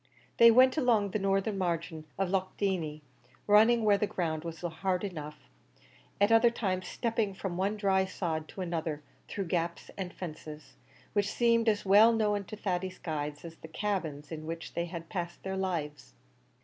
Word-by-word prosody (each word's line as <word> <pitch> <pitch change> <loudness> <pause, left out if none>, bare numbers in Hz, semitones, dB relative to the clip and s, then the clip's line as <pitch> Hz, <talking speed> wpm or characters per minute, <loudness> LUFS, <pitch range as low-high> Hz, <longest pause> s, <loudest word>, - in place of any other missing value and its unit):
They 235 - +9
went 255 +4 +6
along 225 -7 +2
the 215 - -1
northern 195 +1 0
margin 165 -3 -2
of 195 -2 0
Loch 190 -1 -1
Dieney, 165 -7 -1 0.4
running 220 +3 +5
where 205 -2 +4
the 210 - +1
ground 160 -5 -2
was 165 -1 -7
hard 180 +2 -2
enough, 150 -6 -5 0.8
at 205 +2 +4
other 225 +1 +6
times 190 -5 -2
stepping 225 -4 -1
from 190 -2 -4
one 195 +4 0
dry 190 -2 +2
sod 165 -4 -3
to 190 - -8
another, 160 -4 -3 0.2
through 195 - -3
gaps 170 0 -2
and 185 -2 -3
fences, 155 -3 -8 0.4
which 205 -1 +1
seemed 230 -1 +3
as 210 -1 0
well 210 +4 +7
known 210 -3 +1
to 215 - -7
Thady's 185 -2 -3
guides 150 -2 -4
as 165 -1 -9
the - - -11
cabins 160 -6 -3
in 155 -1 -6
which 165 0 -6
they 170 - -1
had 170 -1 -7
passed 175 -2 -5
their 190 0 -3
lives. 150 - -3
185 Hz, 175 wpm, -30 LUFS, 165-205 Hz, 0.8 s, They